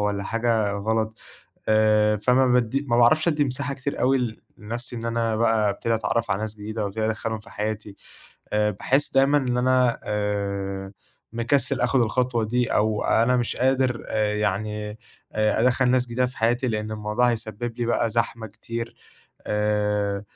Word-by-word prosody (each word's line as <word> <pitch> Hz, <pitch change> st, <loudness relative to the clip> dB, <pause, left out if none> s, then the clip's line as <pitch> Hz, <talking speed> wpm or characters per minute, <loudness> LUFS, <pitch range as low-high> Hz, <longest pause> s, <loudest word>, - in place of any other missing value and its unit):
والّا 105 Hz, -1 st, -1 dB
حاجة 115 Hz, -2 st, 0 dB
غلط، 110 Hz, +2 st, -1 dB, 0.5 s
آآ، 105 Hz, 0 st, +4 dB
فما 125 Hz, +5 st, +3 dB
بادّي 125 Hz, +2 st, +2 dB
ما 120 Hz, -, +2 dB
باعرفش 155 Hz, +8 st, +4 dB
ادّي 150 Hz, -3 st, +2 dB
مساحة 140 Hz, +2 st, -2 dB
كتير 135 Hz, +1 st, -4 dB
أوي 125 Hz, -4 st, +1 dB, 0.2 s
لنَفْسي 120 Hz, +3 st, -6 dB
إن 115 Hz, 0 st, -5 dB
أنا 115 Hz, -1 st, 0 dB
بقى 110 Hz, -2 st, +2 dB
ابتدي 115 Hz, +3 st, -1 dB
أتعرّف 115 Hz, 0 st, -1 dB
على 100 Hz, -, 0 dB
ناس 110 Hz, -1 st, -4 dB
جديدة 110 Hz, +1 st, -5 dB
أو 100 Hz, -, 0 dB
ابتدي 110 Hz, +2 st, -2 dB
أدخّلهم 110 Hz, 0 st, -2 dB
في 115 Hz, +2 st, -16 dB
حياتي، 105 Hz, -1 st, -4 dB, 0.6 s
آآ، 105 Hz, 0 st, +2 dB
باحس 135 Hz, +8 st, +1 dB
دايمًا 135 Hz, +2 st, +4 dB
إن 125 Hz, -3 st, -1 dB
أنا 125 Hz, -1 st, +2 dB
آآ، 100 Hz, -2 st, -2 dB, 0.4 s
مكسّل 120 Hz, +2 st, +1 dB
آخُد 125 Hz, +2 st, +2 dB
الخطوة 120 Hz, 0 st, +1 dB
دي 120 Hz, +3 st, 0 dB
أو 105 Hz, 0 st, +1 dB
أنا 120 Hz, +3 st, +3 dB
مش 120 Hz, -1 st, -1 dB
قادر 130 Hz, -2 st, +1 dB
آآ، 105 Hz, -1 st, 0 dB
يعني 105 Hz, +1 st, -2 dB, 0.4 s
آآ، 110 Hz, 0 st, +1 dB
أدخّل 125 Hz, +1 st, +3 dB
ناس 125 Hz, -1 st, +2 dB
جديدة 125 Hz, +2 st, 0 dB
في 130 Hz, +2 st, -9 dB
حياتي، 120 Hz, +2 st, +1 dB
لأن 105 Hz, -1 st, -2 dB
الموضوع 105 Hz, +3 st, +1 dB
هيسبّب 115 Hz, +1 st, -5 dB
لي 120 Hz, -, 0 dB
بقى 120 Hz, -1 st, +1 dB
زحمة 115 Hz, 0 st, -1 dB
كتير، 115 Hz, +2 st, -6 dB, 0.5 s
آآ، 105 Hz, -1 st, 0 dB
115 Hz, 165 wpm, -24 LUFS, 105-125 Hz, 0.6 s, آآ